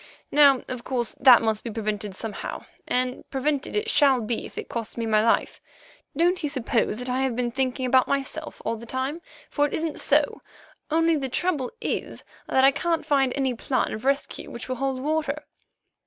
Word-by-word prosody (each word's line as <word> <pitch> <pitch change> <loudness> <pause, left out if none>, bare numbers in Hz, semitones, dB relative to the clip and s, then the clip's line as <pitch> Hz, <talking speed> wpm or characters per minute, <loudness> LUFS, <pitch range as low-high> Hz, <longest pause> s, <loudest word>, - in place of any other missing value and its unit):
Now, 280 -3 +6
of 255 -2 -5
course, 240 -4 0
that 250 -3 +8
must 220 -1 0
be 235 - -4
prevented 210 -2 -3
somehow, 220 +1 -5 0.2
and 250 0 0
prevented 280 +1 -1
it 420 +1 0
shall 280 - +4
be 225 0 -3
if - - -18
it - - -5
costs 230 -1 -5
me 230 - -2
my 215 -1 +3
life. 230 - +1 0.6
Don't 350 +3 +2
you 300 - -1
suppose 250 -5 0
that 250 +1 -4
I 255 +1 0
have 265 -3 0
been 240 0 -1
thinking 260 0 -1
about 255 0 +4
myself 280 +3 -3
all 230 - -1
the 235 +2 -11
time, 265 +7 -3 0.3
for 290 -1 +1
it - - -4
isn't 320 -1 -3
so, - - +2 0.5
only 330 +1 +3
the 270 -2 -3
trouble 295 -2 -1
is - - -3 0.2
that 265 - +3
I 270 - +7
can't 330 +3 -1
find 275 -4 +2
any 265 -2 0
plan 250 +2 -1
of 215 - -6
rescue 275 +1 -1
which 235 - -7
will 255 -1 -3
hold 270 0 -1
water." 300 0 -1
265 Hz, 195 wpm, -25 LUFS, 240-290 Hz, 0.6 s, that